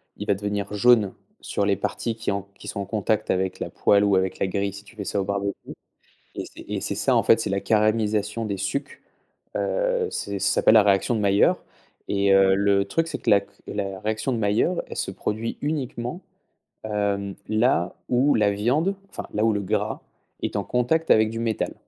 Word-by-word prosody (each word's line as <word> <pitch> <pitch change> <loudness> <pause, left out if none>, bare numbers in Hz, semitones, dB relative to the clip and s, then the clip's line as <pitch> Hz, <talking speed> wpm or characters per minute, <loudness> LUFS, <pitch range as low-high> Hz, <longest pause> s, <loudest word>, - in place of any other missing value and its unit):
il 105 - -7
va 100 - +3
devenir 100 0 -3
jaune 105 -2 +4 0.3
sur 100 - -1
les 100 -1 +2
parties 115 +3 -3
qui 110 - -2
ont 100 0 -2
qui - - -8
sont - - -4
en 100 - -3
contact 110 +1 -1
avec 95 0 0
la - - -4
poêle 100 0 +3
ou 100 -1 +3
avec 95 0 0
la - - +1
grille 100 +1 -1
si 100 +1 -11
tu 115 - -17
fais 105 - -5
ça 100 - -2
au 95 - -1
barbecue 100 0 -1 0.8
et - - -3
c'est - - -12
et - - -3
c'est - - -2
ça - - +2
en - - +3
fait. - - +5
C'est - - -2
la 100 0 -1
caramélisation 110 0 +1
des 100 -2 -3
sucs, 135 +9 -4 0.5
heu, - - 0
c'est 100 -1 -3
ça 100 - +1
s'appelle - - +5
la 110 - +8
réaction 100 +3 +2
de 110 - 0
Mailleur 100 0 +3 0.5
et 100 -1 +2
heu, 95 0 +5
le 100 0 +2
truc 165 +12 -1
c'est 150 - -4
que - - -7
la 100 - +6
c 100 - -16 0.2
la 100 -2 -4
réaction 110 +4 -1
de 120 - -1
Mailleur 110 - +1
elle - - -8
se - - -2
produit 110 +2 -3
uniquement, 140 +1 -3 0.6
heu, 100 -2 -1
là 110 -5 +2
où 130 +4 +3
la 105 -2 +3
viande, 130 - +1 0.2
enfin, - - -6
là 105 - +1
où 115 - +4
le 105 - -1
gras 95 - -1 0.4
est - - -3
en 100 - 0
contact 125 +9 0
avec 110 0 +5
du 115 +1 -4
métal. 115 -2 -1
105 Hz, 215 wpm, -24 LUFS, 100-115 Hz, 0.8 s, la